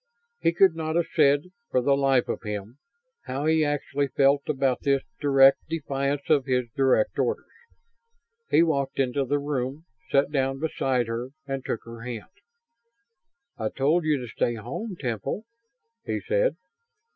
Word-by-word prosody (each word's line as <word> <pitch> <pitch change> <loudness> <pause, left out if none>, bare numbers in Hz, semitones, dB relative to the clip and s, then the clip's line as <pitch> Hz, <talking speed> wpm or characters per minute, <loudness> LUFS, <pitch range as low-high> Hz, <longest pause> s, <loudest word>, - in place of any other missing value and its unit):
He - - +2
could 180 +1 +5
not 160 0 -3
have 170 -1 +2
said, 145 +3 +3 0.2
for 130 - +2
the 140 +2 +3
life 135 -2 +2
of - - -3
him, 105 +4 -6 0.5
how 135 +3 -3
he 160 0 +3
actually 145 -1 -1
felt 140 +1 +3
about 135 -3 +1
this 140 -1 +1 0.2
direct 135 -2 +6
defiance 140 -3 -2
of 145 -4 +3
his 125 -1 +1
direct 130 -5 +2
orders. 460 0 0 1.0
He 165 - +5
walked 140 -5 0
into 135 +1 +1
the 145 +3 +1
room, 140 +1 -3 0.2
sat 140 +1 +2
down 135 -2 0
beside 135 -5 0
her 115 +2 -4 0.2
and 135 -1 -4
took 115 - -3
her 115 0 -9
hand. 120 +6 -7 1.3
"I 110 -1 -1
told 150 +8 +1
you 155 -1 +2
to 125 -2 -6
stay 120 +2 -1
home, 135 - -5
Temple," 125 - -3 0.6
he - - -2
said. - - +1
140 Hz, 155 wpm, -26 LUFS, 125-150 Hz, 1.3 s, direct